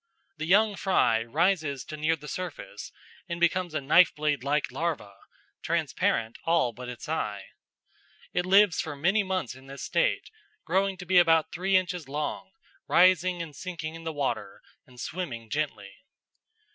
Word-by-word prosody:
The 155 Hz, +1 st, -4 dB
young 205 Hz, +3 st, +4 dB
fry 115 Hz, -, +2 dB
rises 155 Hz, +1 st, 0 dB
to 155 Hz, -, -7 dB
near 155 Hz, +2 st, +1 dB
the 150 Hz, -1 st, -12 dB
surface 175 Hz, -, -6 dB, 0.4 s
and 170 Hz, 0 st, -3 dB
becomes 175 Hz, -1 st, +1 dB
a 155 Hz, -, 0 dB
knife 160 Hz, +6 st, +5 dB
blade 150 Hz, -3 st, -1 dB
like 145 Hz, +1 st, 0 dB
larva, 155 Hz, -12 st, -3 dB, 0.5 s
transparent 115 Hz, 0 st, -1 dB
all 165 Hz, -8 st, +2 dB
but 125 Hz, +1 st, -8 dB
its 120 Hz, -3 st, -8 dB
eye. -, -, -2 dB, 0.9 s
It 180 Hz, 0 st, 0 dB
lives 195 Hz, -2 st, +5 dB
for 150 Hz, -2 st, -6 dB
many 190 Hz, +9 st, +2 dB
months 185 Hz, -, -2 dB
in 130 Hz, +1 st, -15 dB
this 140 Hz, 0 st, -8 dB
state, -, -, 0 dB, 0.3 s
growing 190 Hz, +2 st, +1 dB
to 180 Hz, -, -8 dB
be 180 Hz, 0 st, +5 dB
about 165 Hz, -2 st, +4 dB
three 190 Hz, +2 st, +2 dB
inches 180 Hz, -5 st, -3 dB
long, 150 Hz, +6 st, -3 dB, 0.4 s
rising 180 Hz, -1 st, +4 dB
and 155 Hz, -3 st, -10 dB
sinking 165 Hz, -1 st, -6 dB
in 165 Hz, 0 st, -9 dB
the 165 Hz, -, -3 dB
water, 145 Hz, -3 st, -3 dB, 0.2 s
and 125 Hz, -1 st, -16 dB
swimming 120 Hz, -9 st, -5 dB
gently. 145 Hz, -10 st, -3 dB
165 Hz, 160 wpm, -27 LUFS, 140-185 Hz, 0.9 s, knife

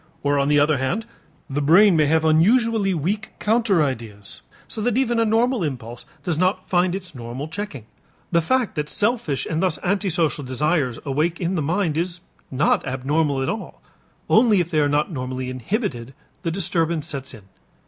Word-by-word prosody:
Or, 145 Hz, 0 st, +2 dB
on 140 Hz, -, +1 dB
the 145 Hz, 0 st, +4 dB
other 145 Hz, -1 st, +3 dB
hand, 175 Hz, +13 st, -1 dB, 0.4 s
the 145 Hz, 0 st, -2 dB
brain 175 Hz, +6 st, +6 dB
may 155 Hz, -2 st, +3 dB
have 160 Hz, +1 st, +2 dB
unusually 205 Hz, +6 st, +3 dB
weak 190 Hz, +6 st, -2 dB
counter 215 Hz, -6 st, +2 dB
ideas 115 Hz, -7 st, -5 dB, 0.3 s
so 220 Hz, -, -5 dB
that 240 Hz, +1 st, +1 dB
even 240 Hz, -3 st, +1 dB
a 230 Hz, -, +3 dB
normal 230 Hz, 0 st, +2 dB
impulse 120 Hz, -5 st, -6 dB, 0.2 s
does 165 Hz, -4 st, -1 dB
not 185 Hz, +1 st, +1 dB
find 180 Hz, 0 st, +2 dB
its 185 Hz, -4 st, -7 dB
normal 125 Hz, +3 st, -6 dB
checking. 160 Hz, -, -6 dB, 0.5 s
The 170 Hz, -1 st, +3 dB
fact 255 Hz, +6 st, 0 dB
that 150 Hz, -2 st, -3 dB
selfish 210 Hz, -, 0 dB
and 160 Hz, 0 st, -1 dB
thus 185 Hz, -5 st, +1 dB
antisocial 180 Hz, -6 st, 0 dB
desires 130 Hz, 0 st, 0 dB
awake 155 Hz, +5 st, 0 dB
in 175 Hz, +1 st, -1 dB
the 175 Hz, -, 0 dB
mind 165 Hz, +1 st, 0 dB
is 170 Hz, +1 st, -2 dB, 0.3 s
not 135 Hz, +3 st, +2 dB
abnormal 135 Hz, +2 st, 0 dB
at -, -, -1 dB
all; 215 Hz, +1 st, -5 dB, 0.5 s
only 220 Hz, -3 st, +5 dB
if 175 Hz, 0 st, -1 dB
they 155 Hz, -, +2 dB
are 145 Hz, -1 st, +2 dB
not 150 Hz, +4 st, +1 dB
normally 130 Hz, -2 st, -4 dB
inhibited, 130 Hz, -, -3 dB, 0.3 s
the 165 Hz, -, -2 dB
disturbance 165 Hz, -3 st, 0 dB
sets 140 Hz, -5 st, -5 dB
in. 105 Hz, -, -14 dB
160 Hz, 180 wpm, -22 LUFS, 140-195 Hz, 0.5 s, brain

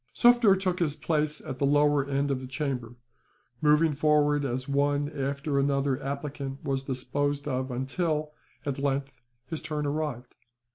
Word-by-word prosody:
Sufder 240 Hz, -4 st, +6 dB
took 185 Hz, -2 st, -1 dB
his 155 Hz, -4 st, 0 dB
place 150 Hz, -1 st, -1 dB
at 130 Hz, -, -7 dB
the 140 Hz, -, +2 dB
lower 145 Hz, 0 st, +4 dB
end 140 Hz, +1 st, 0 dB
of 135 Hz, -, 0 dB
the 130 Hz, -, -7 dB
chamber, 130 Hz, -4 st, -3 dB, 0.7 s
moving 150 Hz, +1 st, +4 dB
forward 150 Hz, 0 st, +3 dB
as 130 Hz, 0 st, -3 dB
one 145 Hz, +1 st, +1 dB
after 140 Hz, 0 st, -1 dB
another 140 Hz, -1 st, +1 dB
applicant 140 Hz, -1 st, -5 dB
was 135 Hz, -1 st, 0 dB
disposed 140 Hz, +2 st, -2 dB
of 130 Hz, -1 st, -1 dB
until, 150 Hz, +4 st, -1 dB, 0.3 s
at 140 Hz, -2 st, -2 dB
length, 140 Hz, 0 st, -1 dB, 0.3 s
his 160 Hz, 0 st, -4 dB
turn 150 Hz, -2 st, -3 dB
arrived. 145 Hz, -4 st, -3 dB
145 Hz, 150 wpm, -28 LUFS, 135-150 Hz, 0.7 s, Sufder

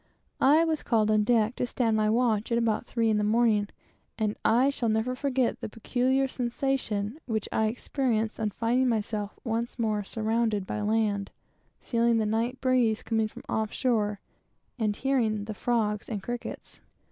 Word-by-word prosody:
I 300 Hz, +5 st, +5 dB
was 320 Hz, -2 st, 0 dB
called 215 Hz, -3 st, +2 dB
on 215 Hz, 0 st, +3 dB
deck 225 Hz, +1 st, +2 dB
to 250 Hz, -, -1 dB
stand 230 Hz, -3 st, 0 dB
my 215 Hz, 0 st, +2 dB
watch 225 Hz, -1 st, +1 dB
at 235 Hz, -, +3 dB
about 230 Hz, 0 st, 0 dB
three 230 Hz, -2 st, +1 dB
in 215 Hz, -, +2 dB
the -, -, +1 dB
morning, 215 Hz, -1 st, +2 dB, 0.5 s
and 215 Hz, -1 st, 0 dB
I 255 Hz, +5 st, +4 dB
shall 240 Hz, -4 st, -1 dB
never 220 Hz, +3 st, 0 dB
forget 260 Hz, -2 st, 0 dB
the -, -, -4 dB
peculiar 260 Hz, +5 st, 0 dB
sensation 245 Hz, -2 st, -2 dB
which 220 Hz, -3 st, -1 dB
I 220 Hz, -, +2 dB
experienced 230 Hz, -1 st, -1 dB
on 215 Hz, -1 st, 0 dB
finding 240 Hz, +5 st, +1 dB
myself 215 Hz, -2 st, -2 dB
once 230 Hz, 0 st, -2 dB
more 215 Hz, -3 st, 0 dB
surrounded 220 Hz, -1 st, -1 dB
by 210 Hz, -, -3 dB
land, 210 Hz, -2 st, 0 dB, 0.5 s
feeling 235 Hz, -1 st, +1 dB
the 220 Hz, -, +1 dB
night 230 Hz, +4 st, -1 dB
breeze 250 Hz, -4 st, +2 dB
coming 220 Hz, -1 st, 0 dB
from -, -, -12 dB
off 220 Hz, -1 st, -1 dB
shore, 210 Hz, -5 st, 0 dB, 0.6 s
and 210 Hz, -2 st, 0 dB
hearing 225 Hz, -6 st, 0 dB
the 215 Hz, -, -5 dB
frogs 210 Hz, -2 st, -1 dB
and 205 Hz, -4 st, -4 dB
crickets. 240 Hz, +2 st, -6 dB
225 Hz, 170 wpm, -28 LUFS, 215-245 Hz, 0.6 s, I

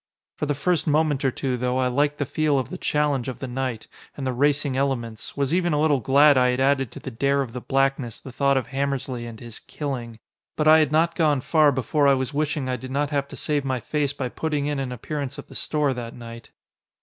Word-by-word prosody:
For 150 Hz, -, -1 dB
the 145 Hz, -, 0 dB
first 170 Hz, +4 st, 0 dB
moment 150 Hz, -2 st, +2 dB
or 135 Hz, -, +3 dB
two, 130 Hz, 0 st, -2 dB
though, 125 Hz, +1 st, -1 dB
I 130 Hz, -1 st, +2 dB
liked 145 Hz, +3 st, +1 dB
the 145 Hz, -, -1 dB
feel 150 Hz, +1 st, +1 dB
of 130 Hz, -3 st, -2 dB
the -, -, -4 dB
challenge 145 Hz, -4 st, 0 dB
of 130 Hz, -, -4 dB
the 135 Hz, -, -5 dB
night 125 Hz, -3 st, -3 dB, 0.3 s
and 140 Hz, -, -4 dB
the 130 Hz, -, -1 dB
racing 145 Hz, +1 st, +1 dB
elements, 125 Hz, -5 st, -2 dB
was 140 Hz, +1 st, 0 dB
even 175 Hz, -2 st, +2 dB
a 150 Hz, -, +1 dB
little 150 Hz, -3 st, +3 dB
glad 140 Hz, +3 st, +5 dB
I 125 Hz, -, +4 dB
had 125 Hz, +1 st, 0 dB
added 135 Hz, -2 st, +2 dB
to -, -, -8 dB
the 135 Hz, -, -7 dB
dare 140 Hz, +4 st, +1 dB
of 120 Hz, -4 st, -9 dB
the 125 Hz, -, -5 dB
blackness 135 Hz, -3 st, 0 dB
the 130 Hz, -, -10 dB
thought 140 Hz, +2 st, +2 dB
of 130 Hz, -, -2 dB
Hammersly 135 Hz, -3 st, -2 dB
and 115 Hz, -2 st, -9 dB
his 120 Hz, -2 st, -9 dB
"killing." 125 Hz, -6 st, -5 dB, 0.4 s
But 150 Hz, -, +1 dB
I 155 Hz, +1 st, +8 dB
had 155 Hz, -2 st, +2 dB
not 165 Hz, +2 st, +3 dB
gone 150 Hz, -5 st, +2 dB
far 155 Hz, +1 st, +4 dB
before 140 Hz, +3 st, +1 dB
I 140 Hz, -, +5 dB
was 130 Hz, +2 st, -3 dB
wishing 150 Hz, -2 st, -1 dB
I 130 Hz, 0 st, -1 dB
did 130 Hz, -, -8 dB
not 145 Hz, +2 st, -1 dB
have 140 Hz, -1 st, 0 dB
to -, -, -10 dB
save 145 Hz, -2 st, -1 dB
my 130 Hz, -2 st, -1 dB
face 145 Hz, +3 st, -1 dB
by 135 Hz, -2 st, -3 dB
putting 150 Hz, +1 st, -2 dB
in 145 Hz, -1 st, -1 dB
an 130 Hz, -2 st, -3 dB
appearance 140 Hz, +2 st, -5 dB
at -, -, -10 dB
the -, -, -12 dB
store 150 Hz, -3 st, 0 dB
that 120 Hz, -2 st, -7 dB
night. 115 Hz, -1 st, -10 dB
140 Hz, 245 wpm, -24 LUFS, 125-145 Hz, 0.4 s, I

